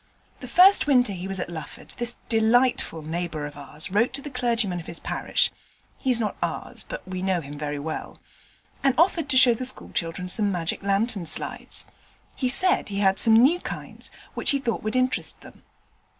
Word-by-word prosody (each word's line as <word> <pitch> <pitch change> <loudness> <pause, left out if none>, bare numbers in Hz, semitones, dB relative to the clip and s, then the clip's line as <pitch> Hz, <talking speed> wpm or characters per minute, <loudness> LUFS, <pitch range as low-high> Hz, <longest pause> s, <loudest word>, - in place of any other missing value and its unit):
The - - -8
first 375 -1 +6
winter 250 -7 +3
he 185 0 -6
was 195 -1 -2
at 175 - -4
Lufford 160 -3 -9
this 240 0 -2
delightful 225 -6 +2
neighbour 160 -1 -4
of 145 - -8
ours 145 +4 -7
wrote 230 +6 +2
to 275 - -1
the 290 - -7
clergyman 235 -7 0
of 165 - -10
his 170 - -5
parish - - +1 0.4
(he's 255 -3 -1
not 215 -2 -2
ours, - - -4
but - - -7
we 185 -1 -5
know 190 -1 +1
him 145 -2 -9
very 145 0 -4
well) 155 +2 -6 0.6
and 270 -2 +3
offered 330 -2 +2
to 265 - +4
show 250 -1 +8
the 230 - -5
school 255 0 -1
children 170 +2 -3
some 205 +2 +1
magic 170 -3 -3
lantern 200 -2 0
slides. 155 - -3 0.5
He 255 - -1
said 365 - +3
he 200 - -4
had 195 -1 +3
some 225 -1 +6
new 280 +10 +5
kinds, - - -7 0.2
which - - 0
he 280 - +3
thought 245 -4 -2
would 215 +3 -3
interest 255 0 0
them. - - -15
210 Hz, 195 wpm, -25 LUFS, 175-255 Hz, 0.6 s, show